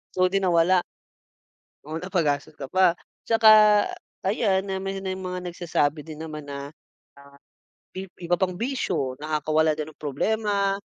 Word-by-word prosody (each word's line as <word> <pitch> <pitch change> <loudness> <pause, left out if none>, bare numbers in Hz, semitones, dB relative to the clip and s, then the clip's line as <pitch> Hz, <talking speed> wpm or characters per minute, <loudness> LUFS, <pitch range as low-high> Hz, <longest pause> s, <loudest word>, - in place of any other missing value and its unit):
So, 185 0 +3
di 195 - +2
nawala. 180 -1 +3 1.0
Oo, 155 +2 -6
napagastos 165 -5 -1
ka 135 - -5
pa. 185 +1 +4 0.3
Tsaka, 225 -1 +4 0.7
ayan, 195 -1 +1
na 190 - -2
may 195 0 -4
ng 190 -1 -3
mga 180 -1 -5
nagsasabi 155 -4 -1
din 155 -1 -9
naman 155 -2 -7
na, 140 0 -6
ah, - - -15 1.2
i 190 +1 -6 0.2
iba 175 +1 +1
pang 185 -1 +1
bisyo, 175 - -2
nakakawala 155 +1 +1
daw 155 - -3
ng 155 - -22
problema, 200 +6 0
180 Hz, 145 wpm, -25 LUFS, 155-190 Hz, 1.2 s, pa